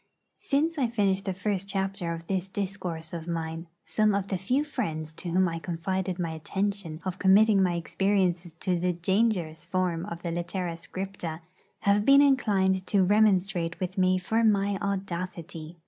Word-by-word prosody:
Since 310 +3 0
I 255 - +3
finished 200 -4 0
the 190 - 0
first 195 0 -2
chapter 195 -3 -2
of 165 0 -6
this 190 0 -1
discourse 185 -5 -4
of 170 -1 -5
mine, 165 0 -4 0.2
some 215 -2 +2
of 200 -1 -2
the 190 - 0
few 250 +10 +1
friends 160 - -3
to 175 - -6
whom 185 +2 +3
I 165 -1 -3
confided 185 +2 -2
my 170 -3 -2
intention 185 0 -3
of 185 0 -3
committing 200 +1 +5
my 180 -2 +2
experiences 180 -1 0
to 180 -2 +1
the 180 +1 +1
dangerous 175 -3 0
form 180 -1 -1
of 170 -3 -7
the 170 - -2
litera 175 +1 -3
scripta 175 -2 -6 0.4
have 200 +1 +3
been 275 +4 +7
inclined 195 -9 +2
to 200 -2 +3
remonstrate 190 -4 +2
with 185 0 -3
me 185 0 +4
for 220 +5 0
my 200 -2 +2
audacity. 180 -4 -4
185 Hz, 165 wpm, -27 LUFS, 170-200 Hz, 0.4 s, been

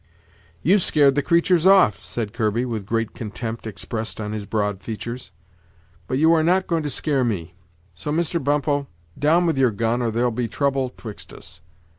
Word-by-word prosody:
"You've 190 +5 +4
scared 145 -4 +4
the 145 - +1
creatur's 170 +3 +3
off," 185 - +5
said 105 +4 -4
Kirby, 115 +1 0
with 110 -5 -4
great 115 0 -1
contempt 115 +1 -6
expressed 110 +3 -5
on 105 -1 -4
his 105 -2 -5
broad 105 -2 -1
features; 115 0 -6 0.8
"but 130 - -1
you 160 +3 +5
are 160 - +4
not 185 +4 +2
going 165 -2 0
to 150 - -3
scare 140 0 0
me; 90 -8 -3 0.4
so, 85 - -5
Mr. 170 0 0
Bumppo, 145 0 0 0.3
down 165 +5 +3
with 160 -5 +1
your 130 -2 +4
gun, 115 +3 -1
or 120 - 0
there'll 120 +2 0
be 120 +1 -2
trouble 135 +2 0
'twixt 110 -4 -10
us." 85 - -13
125 Hz, 180 wpm, -22 LUFS, 110-150 Hz, 0.8 s, off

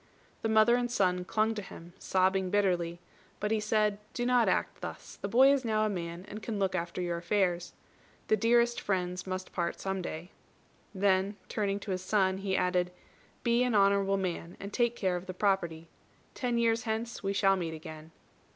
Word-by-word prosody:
The 225 - -1
mother 220 +2 +5
and 245 0 -1
son 180 -5 +1
clung 220 +3 +1
to 215 - -4
him, 175 -3 -11
sobbing 190 0 +1
bitterly; 180 -4 +1 0.4
but 210 - -1
he 220 - +2
said, 210 -1 +1 0.2
"Do 240 - -1
not 245 -2 +4
act - - -1
thus. - - -8
The - - -2
boy 260 +6 +6
is 275 -2 0
now 215 -2 +1
a - - +1
man, 170 -2 -5
and 215 - -7
can 215 0 -4
look 195 -1 0
after 170 0 -3
your 170 -1 -2
affairs. 175 -1 0 0.5
The - - +4
dearest 235 +2 +3
friends 180 -1 -2
must 185 0 -5
part 170 -2 -2
some 190 -1 -2
day." 175 +2 -6 0.6
Then, 195 +1 +2
turning 200 -2 -1
to 200 - -5
his 185 -1 -2
son, 190 -1 +1
he 195 -1 -1
added, 180 -1 +1 0.5
"Be 235 +1 +3
an 250 -3 +2
honourable 195 -1 +3
man, 175 -2 -4
and 200 +1 -7
take 240 -1 +1
care 185 -5 0
of 180 +1 -6
the 185 - -6
property. 170 -5 0 0.5
Ten 245 -3 -1
years 230 -1 +2
hence 225 +1 -3
we 195 - -1
shall 195 -1 +3
meet 165 -3 -3
again." 155 0 -10
195 Hz, 190 wpm, -30 LUFS, 180-220 Hz, 0.6 s, boy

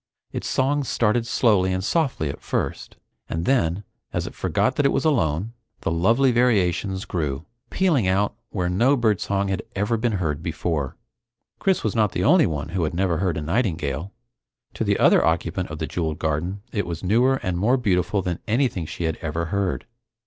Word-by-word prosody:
Its - - -4
song 140 +2 +1
started 115 -2 +1
slowly 105 -7 +3
and 95 0 -1
softly 135 - 0
at 70 - -6
first, - - -3 0.3
and 85 +1 -2
then, 100 -8 +1 0.3
as - - -2
it - - -7
forgot - - 0
that 145 - +1
it - - +1
was - - 0
alone, 105 - +1 0.3
the - - -1
lovely 115 +11 +3
variations 100 -5 +1
grew, 75 -6 -3 0.2
pealing 160 - +2
out 100 +2 +2 0.2
where 90 -3 -2
no 120 +11 +3
birdsong 100 -3 +1
had 95 -2 -1
ever 105 +4 0
been 115 0 0
heard 80 -6 -1
before. 80 -4 -2 0.6
Chris 190 -2 +1
was 110 - -1
not 105 -4 +2
the 90 - -1
only 160 - +5
one 75 -2 -3
who 90 0 -1
had 80 +1 -2
never 90 -2 +1
heard 90 -3 0
a - - -2
nightingale. 80 - -1 0.6
To - - -2
the - - +1
other - - +5
occupant 85 +2 0
of 75 - -6
the 80 - -2
jeweled 80 -2 -2
garden, 85 +5 -2
it 100 -4 -2
was 85 0 -5
newer 120 +8 +3
and 90 -1 -1
more 110 +9 +2
beautiful 100 -4 +1
than 90 -2 -2
anything 110 - 0
she 85 - -5
had 80 -1 -1
ever 80 +1 -3
heard. 100 -2 -1
95 Hz, 185 wpm, -23 LUFS, 85-115 Hz, 0.6 s, only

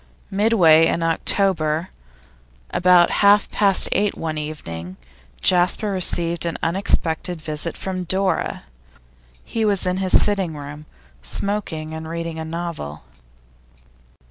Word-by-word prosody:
Midway 190 -6 +4
in 165 - -1
October, 165 -1 0 0.8
about 180 -1 +4
half 205 0 +4
past 200 -3 +3
eight 205 0 0
one 160 -1 -4
evening, 95 - -7 0.4
Jasper 180 +4 +3
received 170 -2 +1
an 170 -1 -2
unexpected 170 -1 0
visit 155 +1 -4
from 185 -1 -4
Dora. 190 +2 -1 0.8
He 225 - -3
was 200 -3 +1
in 180 0 -1
his 190 -1 +4
sitting 190 -6 0
room, 145 +1 -9 0.3
smoking 160 - -3
and 160 0 -7
reading 165 -1 -5
a - - -4
novel. 160 - -6
170 Hz, 115 wpm, -21 LUFS, 155-190 Hz, 0.8 s, Midway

